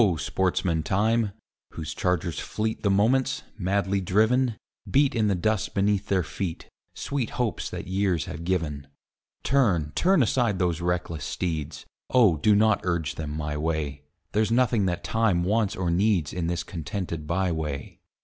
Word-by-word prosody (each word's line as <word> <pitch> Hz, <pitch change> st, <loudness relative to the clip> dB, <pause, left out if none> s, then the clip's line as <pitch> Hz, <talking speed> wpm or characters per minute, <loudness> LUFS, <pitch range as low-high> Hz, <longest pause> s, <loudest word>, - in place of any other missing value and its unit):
sportsman 85 Hz, +2 st, 0 dB
Time, 110 Hz, +5 st, +1 dB, 0.4 s
whose 80 Hz, -1 st, -5 dB
chargers 90 Hz, -3 st, -1 dB
fleet 110 Hz, +1 st, -3 dB
The 100 Hz, -, +1 dB
moments, 130 Hz, +8 st, +2 dB, 0.2 s
madly 100 Hz, +1 st, 0 dB
driven, 110 Hz, +5 st, +2 dB, 0.3 s
Beat 140 Hz, 0 st, +3 dB
in 110 Hz, -3 st, +2 dB
the 100 Hz, -, +2 dB
dust 105 Hz, +3 st, -1 dB
beneath 100 Hz, 0 st, +1 dB
their 95 Hz, -2 st, +2 dB
feet 85 Hz, +1 st, -5 dB, 0.3 s
Sweet 135 Hz, -5 st, -2 dB
hopes 120 Hz, -4 st, -2 dB
that -, -, -6 dB
years 95 Hz, -3 st, 0 dB
have 85 Hz, -, -7 dB
given; 80 Hz, -6 st, -2 dB, 0.6 s
Turn, 95 Hz, -, +2 dB
turn 185 Hz, -5 st, +4 dB
aside 115 Hz, -3 st, +1 dB
those 90 Hz, -2 st, 0 dB
reckless 85 Hz, -3 st, -2 dB
steeds, 80 Hz, -4 st, -3 dB, 0.2 s
Oh! 110 Hz, -11 st, +5 dB
do 105 Hz, +8 st, +4 dB
not 110 Hz, 0 st, +3 dB
urge 85 Hz, -4 st, -1 dB
them 75 Hz, -1 st, -5 dB
my 75 Hz, -1 st, -3 dB
way; 75 Hz, -3 st, -2 dB, 0.3 s
There's 110 Hz, 0 st, +1 dB
nothing 115 Hz, -4 st, +3 dB
that 85 Hz, -1 st, -2 dB
Time 110 Hz, -6 st, +1 dB
wants 105 Hz, +2 st, +1 dB
or 90 Hz, -2 st, -1 dB
needs 90 Hz, -3 st, +2 dB
In 90 Hz, -2 st, -2 dB
this 85 Hz, 0 st, -1 dB
contented 85 Hz, -1 st, -5 dB
by 90 Hz, +2 st, 0 dB
way. 75 Hz, -4 st, -4 dB
95 Hz, 155 wpm, -26 LUFS, 80-110 Hz, 0.6 s, Oh